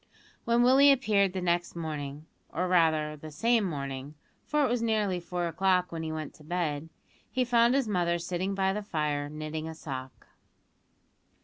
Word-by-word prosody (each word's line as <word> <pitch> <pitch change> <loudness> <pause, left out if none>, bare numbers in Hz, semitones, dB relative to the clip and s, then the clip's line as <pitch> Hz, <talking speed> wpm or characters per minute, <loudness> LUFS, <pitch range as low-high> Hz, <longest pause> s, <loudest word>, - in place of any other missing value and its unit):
When 235 +1 +3
Willie 270 +3 +7
appeared 205 -8 +2
next 175 -2 0
morning 150 -3 -5 0.2
or 180 +2 -1
rather, 160 -4 +2
the 155 +1 -9
same 230 +9 +2
morning, 140 -4 -4 0.3
for 300 -1 +2
it - - +2
was 245 -1 0
nearly 210 -5 +1
four 175 0 -3
o'clock 180 +1 +1
when 165 -1 -4
he 160 -1 -3
went 155 -2 -5
to 150 - -16
bed 160 -2 -2 0.4
he 255 +1 0
found 240 +1 +4
his 275 -4 +1
mother 175 -4 +1
sitting 185 +3 -2
by 190 0 +1
the 210 - -3
fire 150 -7 -2
knitting 155 +1 -5
a 160 - -7
sock. 130 -4 -7
175 Hz, 170 wpm, -29 LUFS, 155-210 Hz, 0.4 s, Willie